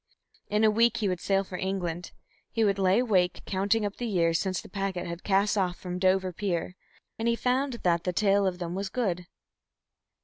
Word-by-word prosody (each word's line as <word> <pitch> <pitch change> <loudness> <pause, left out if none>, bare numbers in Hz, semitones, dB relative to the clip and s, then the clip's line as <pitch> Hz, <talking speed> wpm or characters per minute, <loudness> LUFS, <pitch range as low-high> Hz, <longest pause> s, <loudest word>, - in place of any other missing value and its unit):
In 210 +1 +2
a 215 - +6
week 230 +2 +3
he 210 - 0
would 180 -2 -1
sail 195 +2 +1
for 185 -1 -7
England; 180 -3 -3 0.4
he 225 - +1
lay 195 -1 +3
awake, 195 -8 +2
counting 205 +3 +1
up 205 - -4
the 240 - -3
years 170 -5 +2
since 185 -2 -1
the - - -10
packet 195 -2 -3
had 170 +1 -6
cast 205 +1 +2
off 180 -2 0
from 180 -1 -5
Dover 185 0 +2
pier, 180 -2 -2 0.4
and 225 - 0
he 235 - +3
found 255 +3 0
that 170 -1 +2
the 180 - 0
tale 200 +1 +3
of 180 -1 -2
them 175 -1 -4
was 195 +1 -3
good. 180 -8 -2
195 Hz, 200 wpm, -28 LUFS, 180-210 Hz, 0.4 s, a